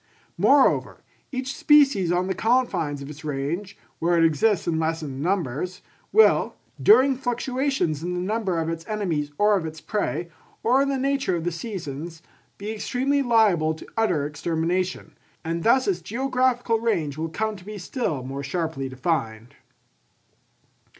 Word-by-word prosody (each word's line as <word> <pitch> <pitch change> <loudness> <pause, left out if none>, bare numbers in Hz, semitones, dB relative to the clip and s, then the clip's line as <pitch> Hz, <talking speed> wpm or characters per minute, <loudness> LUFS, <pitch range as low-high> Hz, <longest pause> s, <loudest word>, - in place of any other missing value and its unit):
Moreover, 280 -1 +3 0.3
each 260 +1 -4
species 270 - +4
on 180 +1 +1
the 190 - -1
confines 185 - 0
of 140 - -9
its 150 +2 -12
range, 155 +7 -3 0.2
where 170 +1 +2
it 165 - +5
exists 165 +5 +2
in 160 -2 +1
lessened 160 -4 -2
numbers, 180 0 -2 0.3
will, 440 - +4 0.3
during 275 -10 +6
fluctuations 250 - -1
in 180 +2 -3
the - - -2
number 195 -1 -1
of 165 -1 -1
its 165 0 -4
enemies 170 -9 -2
or 210 0 +4
of 190 - -1
its 160 0 -6
prey, 175 -2 -3 0.3
or 255 +4 +4
in 275 - +1
the 275 - 0
nature 270 -7 0
of 165 - -3
the 175 - -1
seasons, 165 - -6 0.3
be 205 +2 -5
extremely 255 +6 0
liable 210 - +3
to - - -11
utter 180 -10 +1
extermination; 170 +4 -2 0.3
and 165 +1 -2
thus 255 +7 +3
its 180 -3 0
geographical 250 +2 0
range 165 -11 -1
will 160 +2 -3
come 215 +6 -2
to 185 - -12
be 210 +2 -8
still 175 - -3
more 135 +2 -5
sharply 150 -2 -3
defined. 125 -5 -2
180 Hz, 155 wpm, -24 LUFS, 160-230 Hz, 0.3 s, during